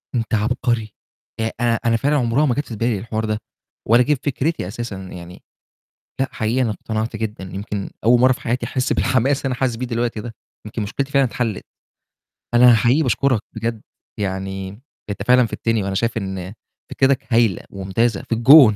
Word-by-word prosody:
أنت 115 -1 -2
عَبقري، 115 0 0 0.5
آآ 110 0 0
أنا 115 -1 +2
أنا 115 -1 +3
فعلًا 145 +5 +1
عُمرها 125 +2 +2
ما 125 -5 +1
جات 145 - -1
في 115 - -6
بالي 115 -1 0
الحوار 110 0 -3
ده 110 -1 -1 0.5
ولا 115 +3 +6
جِه 150 - +2
في 140 - -3
فكرتي 145 - -1
أساسًا، 115 +1 -5
يعني 90 -2 -10 0.8
لأ، 135 - +1
حقيقي 115 +3 0
أنا 115 - +1
اقتنعت 110 +2 -3
جدًا، 110 -3 -4
يمكن 100 +2 -5
أول 120 +2 +5
مرّة 130 +1 +6
في - - -6
حياتي 120 0 -1
أحس 125 +1 -1
بالحماس 130 +3 +2
اللي 135 - -5
أنا 130 - 0
حاسس 130 -3 +1
بيه 125 +2 -3
دلوقتي 115 -2 -2
ده، 115 +1 -7 0.3
يمكن 105 +1 -4
مُشكلتي 135 +7 -3
فعلًا 140 -1 +4
اتحلِّت. 115 -3 -3 0.9
أنا 120 0 +7
حقيقي 125 +8 +3
باشكرك 130 -2 +2
بجد، 115 0 -3 0.4
يعني 95 -1 -3 0.4
أنت 100 0 -4
فعلًا 125 0 +6
فِدتني 115 -1 -1
وأنا 95 0 -2
شايف 115 +3 0
إن 95 -2 -4 0.4
فكرِتك 135 -3 +1
هايلة 115 -6 +3
ومُمتازة، 100 +3 -1
في 115 - +2
الجون. 120 -1 +8
115 Hz, 180 wpm, -21 LUFS, 105-125 Hz, 0.9 s, الجون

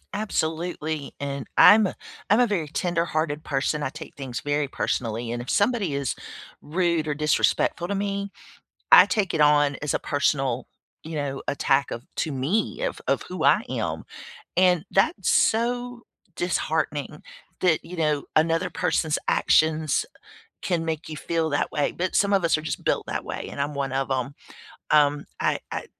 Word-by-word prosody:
Absolutely 160 -6 -2
and 140 -3 -4
I'm 210 -1 +8
a - - -6 0.3
I'm 210 +4 +5
a 245 - +6
very 180 -8 -1
tenderhearted 160 -2 -1
person 145 +1 -1
I 145 - -1
take 155 +3 -10
things 130 -4 -5
very 145 0 0
personally 115 -3 -2
and 120 0 -3
if 120 - -8
somebody 205 - +1
is 140 -2 -2 0.5
rude 170 0 0
or 150 - 0
disrespectful 150 +3 +1
to 200 - -2
me, 200 0 -2 0.6
I - - +10
take 205 -4 0
it 160 - 0
on 145 -1 +4
as 150 - -1
a - - +2
personal, 135 -4 0 0.4
you 160 +1 -7
know, 140 -2 -3
attack 140 -1 +1
of 120 - -6
to 155 - -1
me 155 - -1
of - - -2
of - - +1
who - - -4
I - - +5
am - - -3 0.5
and 180 -3 +3
that's 195 0 +2
so 245 +2 +1 0.3
disheartening 155 -4 -2 0.4
that, 175 -4 +2
you 180 0 -9
know, 150 -3 0
another 165 +3 +2
person's 155 -2 0
actions 155 -2 +2 0.6
can 170 -3 -1
make 160 0 -3
you 155 - -6
feel 165 +1 -1
that 145 - -1
way, 145 -1 0
but 185 +1 -3
some 200 0 +3
of 190 - +2
us 165 -2 +3
are - - -6
just 155 - -4
built - - 0
that - - -3
way - - -5
and 140 - -3
I'm 145 +1 -2
one 140 -1 -2
of 135 0 -1
'em, 130 +1 -1 0.6
um, 145 -1 +4
I - - +1
I - - -4
155 Hz, 170 wpm, -25 LUFS, 145-180 Hz, 0.6 s, I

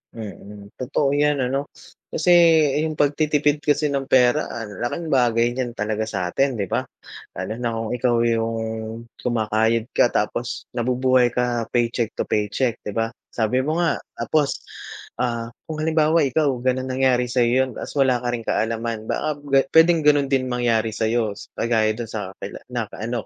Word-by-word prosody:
Mm, 105 -2 -9
totoo 135 +2 0
yan 145 -1 +2
ano. 135 +3 -1 0.4
Kasi, 170 +3 +1 0.5
'yong 155 0 -1
pagtitipid 150 0 +2
kasi 145 0 +1
ng 135 -1 -2
pera, 130 +3 +4
ang 105 -4 -7
laking 160 +8 -3
bagay 120 -2 +3
niyan 120 -1 -3
talaga 110 0 -2
sa'tin, 105 +7 0
'di 105 - -1
ba? - - -1 0.5
Lalo 110 - -4
na 120 -2 -2
kung 115 -1 -3
ikaw 125 0 +1
'yong, 115 -1 -2 0.2
kumakayod 115 0 0
ka - - +4
tapos, 120 +2 -2
nabubuhay 125 +1 +2
ka 120 -1 -1
paycheck 120 -1 0
to - - -1
paycheck, 110 +4 -1
'di 105 - -5
ba? 115 0 0 0.2
Sabi 115 +2 0
mo 155 +5 -1
nga 165 - +1 0.2
tapos 140 +5 0 0.6
ah, 120 -2 -1 0.2
kung 155 - -4
halimbawa 160 +1 +3
ikaw 145 +3 +1 0.2
ganun 130 0 0
nangyari 130 -1 +2
sa'yo 120 -1 +2 0.2
'yon, - - -8
tapos - - -6
wala 130 -2 +4
ka - - -2
rin 120 - -3
kaalaman 115 0 -1
baka 150 +5 -2
ga 135 0 +5 0.2
puwedeng 165 0 +6
gano'n 145 -2 +4
din 130 -1 +1
mangyari 115 -3 0
sa'yo. 110 -1 0 0.2
Kagaya 110 -2 +2
dun 115 +1 -5
sa 105 -4 -5
kakila 100 - -8
naka 120 -4 -4
ano 120 0 -2
120 Hz, 165 wpm, -22 LUFS, 115-135 Hz, 0.6 s, puwedeng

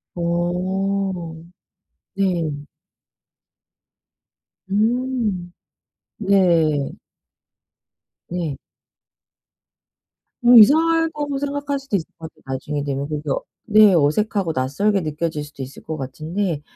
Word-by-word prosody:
어. 180 +1 -1 0.8
네. 180 -5 0 2.2
음. 220 -3 0 0.7
네. 170 -8 +2 1.4
네. 170 -6 -3 1.9
음 240 0 +9
이상하다고 310 +2 +4
생각할 285 0 -2
수도 270 -6 -3
있을 170 -5 -1
것 160 -1 -8
같아요, - - -27
나중에 135 +2 -3
되면 140 0 -3
그게 150 -1 -4 0.4
네. 215 -2 +6
어색하고 170 +4 +1
낯설게 185 +11 +1
느껴질 155 -1 -3
수도 145 -2 -8
있을 130 +2 -10
것 160 0 -5
같은데. 155 +5 -3
180 Hz, 170 characters per minute, -21 LUFS, 155-215 Hz, 2.2 s, 음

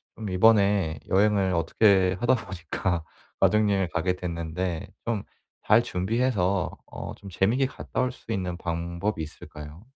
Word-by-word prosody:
좀 110 -3 -5
이번에 100 -5 +3
여행을 100 -1 +3
어떻게 95 +2 +3
하다 125 +2 +3
보니까 90 -5 -3 0.4
가족여행을 100 -1 +3
가게 90 +3 0
됐는데 85 -1 -3 0.2
좀 115 -4 -1 0.4
잘 110 +2 +5
준비해서 100 -3 0 0.2
어 - - -6
좀 100 - -11
재밌게 110 +9 +2
갔다 - - -4
올 130 - +1
수 115 - -10
있는 90 -4 -2
방법이 85 +3 -3
있을까요? 75 +4 -10
95 Hz, 295 characters per minute, -26 LUFS, 85-105 Hz, 0.4 s, 잘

